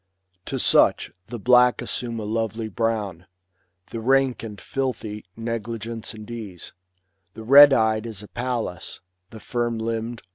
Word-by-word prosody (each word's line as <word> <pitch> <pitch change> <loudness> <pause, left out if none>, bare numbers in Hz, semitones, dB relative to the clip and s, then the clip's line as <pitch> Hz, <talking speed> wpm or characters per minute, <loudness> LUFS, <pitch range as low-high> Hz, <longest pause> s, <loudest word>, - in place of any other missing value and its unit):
To - - -3
such - - +3 0.2
the 120 - -6
black 125 +2 +4
assume 115 -2 -3
a - - -5
lovely 110 +1 -2
brown; 105 -5 -2 0.6
The 115 - -4
rank 135 +2 +2
and 105 -3 -8
filthy, 115 -6 -4
negligence 115 0 -4
and 110 -1 -10
ease; 105 -7 -8 0.6
The 110 - -8
red 140 +4 +9
eyed 110 -2 +2
is 105 -3 -5
a - - -11
Pallas; 120 -7 -4 0.3
the 110 - -11
firm 120 0 -2
limb'd. 115 +1 -4
115 Hz, 140 wpm, -23 LUFS, 110-120 Hz, 0.6 s, red